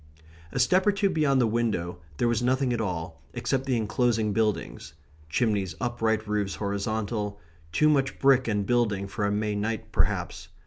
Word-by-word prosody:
A - - -5
step 180 +10 +3
or - - +7
two 200 -1 +1
beyond 140 -4 +2
the 120 - +4
window 105 -7 -1 0.2
there 120 - +2
was 120 -1 +1
nothing 130 +1 +1
at 120 - -1
all, 80 -6 -4
except 135 0 -1
the 130 -2 +2
enclosing 110 -1 +1
buildings 110 -4 -2 0.3
chimneys 100 -1 0
upright, 110 -3 0
roofs 105 -2 -1
horizontal; 105 0 -2 0.3
too 150 - +3
much 140 -3 +2
brick 135 -2 +4
and 105 -2 0
building 105 -4 +1
for 100 +1 -2
a - - 0
May 105 0 0
night, 110 +1 -3
perhaps. - - -1
110 Hz, 170 wpm, -27 LUFS, 105-125 Hz, 0.3 s, or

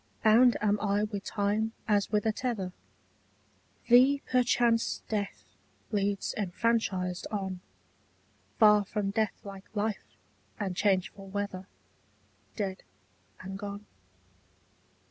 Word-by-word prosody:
Bound 235 +3 +6
am 210 -1 +2
I 205 0 +1
with 205 -2 -4
time 215 +2 0
as 205 -2 +2
with 210 -1 +1
a 220 - +3
tether; 215 -6 -3 1.1
Thee 260 +4 +6
perchance 240 -2 +2
death 205 -2 -3 0.5
leads 200 -1 0
enfranchised 190 -2 -1
on, 190 -3 -3 1.0
Far 210 -1 +6
from 200 0 -2
deathlike 200 -2 -3
life 210 0 -3 0.4
and 195 -3 -2
changeful 195 0 0
weather, 195 -1 -4 0.9
Dead 195 -3 -3 0.6
and 195 +1 -7
gone. 205 0 -6
205 Hz, 100 wpm, -29 LUFS, 195-220 Hz, 1.1 s, Bound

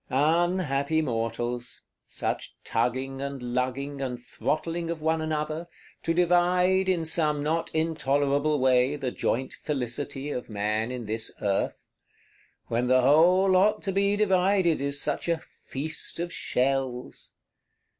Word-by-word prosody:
Unhappy 160 0 +2
mortals: 120 -2 -3 0.2
such - - -3
tugging 135 +2 -1
and 140 0 -4
lugging, 135 +3 -2
and 125 -2 -3
throttling 165 +6 -2
of 170 -1 -3
one 160 +1 +1
another, 155 +1 -2 0.3
to 165 - -1
divide, 180 +2 +3
in 170 -3 +1
some 150 -2 +1
not 160 +2 0
intolerable 145 -2 +1
way, 130 +1 +3
the 135 -4 -3
joint 130 +2 -1
Felicity 140 +1 -3
of 125 -4 -5
man 110 +2 -1
in 125 -2 -5
this 110 +1 -3
Earth; 100 -1 -1 0.8
when 120 +2 -1
the 130 0 +5
whole 170 +8 +5
lot 190 +3 +3
to 195 - -1
be 200 +1 +2
divided 190 -5 +2
is 140 0 +1
such - - -1
a 170 - +2
"feast 155 0 -6
of 175 0 -3
_shells! 130 -3 -2
145 Hz, 130 wpm, -27 LUFS, 130-170 Hz, 0.8 s, the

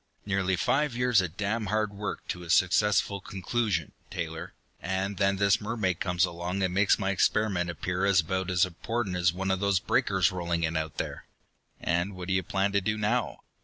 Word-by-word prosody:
Nearly 95 -2 +1
five 135 - +1
years 125 -4 +3
of 90 0 -5
damned 105 +2 -1
hard 105 +1 0
work 105 +1 -5
to 90 - -3
a 85 - -10
successful 100 +2 +3
conclusion, 95 -3 -2 0.2
Taylor, 80 -1 -5 0.3
and 95 +2 -2
then 100 -1 +2
this 100 +1 +3
mermaid 105 -5 -1
comes 90 -1 +2
along 90 +2 -3
and 90 -1 0
makes 100 +2 +4
my 95 -1 0
experiment 95 -2 +1
appear 90 +2 -2
about 95 0 +1
as 90 +1 +3
important 95 +3 -3
as 85 -1 +3
one 95 +2 -2
of 95 - 0
those 100 -2 +2
breakers - - +2
rolling 85 -2 -2
in 80 0 0
out 80 -2 -3
there!" - - -5 0.5
"And 85 +4 -1
what 90 0 -7
do - - +2
you 95 - +2
plan 95 +3 0
to 100 0 +2
do 110 +3 -1
now?" 110 +3 -1
95 Hz, 190 wpm, -28 LUFS, 90-100 Hz, 0.5 s, makes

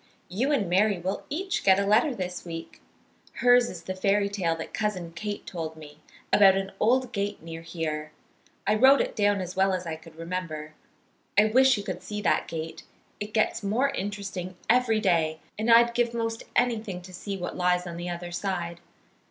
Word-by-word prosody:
"You 235 +11 0
and 255 -10 +1
Mary 195 +3 +3
will 185 +3 -3
each 375 +5 -2
get 190 -1 +6
a 200 - +1
letter 230 +7 +3
this 180 -3 -4
week. 165 -1 -8 0.5
Hers 245 -1 +4
is 170 -2 -8
the 185 - -4
fairy 200 +2 +1
tale 180 -5 0
that 160 - -7
Cousin 185 -6 -2
Kate 205 +4 -5
told 160 -3 -5
me, 150 -1 -12 0.3
about 195 -2 +7
an 195 0 -3
old 250 +3 +2
gate 200 -4 -3
near 165 0 -7
here. 155 -2 -4 0.5
I 210 - +3
wrote 265 +6 +6
it - - -1
down 205 -2 +2
as 180 0 -6
well 190 0 +3
as 180 -1 -2
I 160 -1 -3
could 160 0 -15
remember. 165 -2 -5 0.6
I 210 - +7
wish 260 +3 +5
you 205 - -4
could 185 -3 -5
see 210 +3 -5
that - - +2
gate. 160 0 -5 0.4
It 210 +1 -5
gets 215 +2 +1
more 225 +7 +1
interesting 200 -6 -4
every 235 -2 +3
day, 165 -6 +1 0.2
and 220 +2 0
I'd 235 +1 +6
give 235 0 +1
most 225 -1 -2
anything 215 -7 0
to 185 +1 -12
see 195 +2 -5
what 175 -1 -5
lies 180 0 +1
on 170 -1 -6
the 175 +1 -4
other 175 0 -5
side. 175 -2 -3
195 Hz, 195 wpm, -27 LUFS, 175-215 Hz, 0.6 s, about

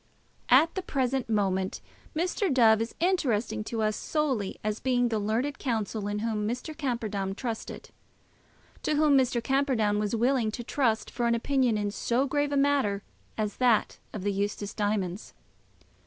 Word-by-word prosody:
At 295 +7 +6
the 380 - -2
present 265 -6 -1
moment 190 -3 0 0.4
Mr. 360 +3 0
Dove 225 -4 +5
is 230 - -4
interesting 240 - +1
to 225 -1 -2
us 215 0 +1
solely 265 -11 -1
as 215 0 -1
being 245 -2 +1
the 220 -2 0
learned 230 +7 -1
counsel 220 -4 -2
in 205 0 -2
whom 210 -2 -1
Mr. 250 +7 -4
Camperdown 215 -9 -2
trusted, 230 -1 -6 0.9
to 305 - 0
whom 300 -1 +4
Mr. 255 -3 +2
Camperdown 255 -7 +1
was 210 +1 -1
willing 240 0 +2
to 240 - -5
trust 230 -4 0
for 240 -1 -1
an 235 - +3
opinion 250 -1 +1
in 205 -1 -1
so 240 +5 0
grave 290 +1 0
a 285 - +1
matter 275 -8 +2 0.3
as 210 -2 -2
that 245 -4 +2
of 205 - -6
the 205 0 0
Eustace 205 +1 -2
diamonds. 205 -2 -2
230 Hz, 160 wpm, -28 LUFS, 210-270 Hz, 0.9 s, At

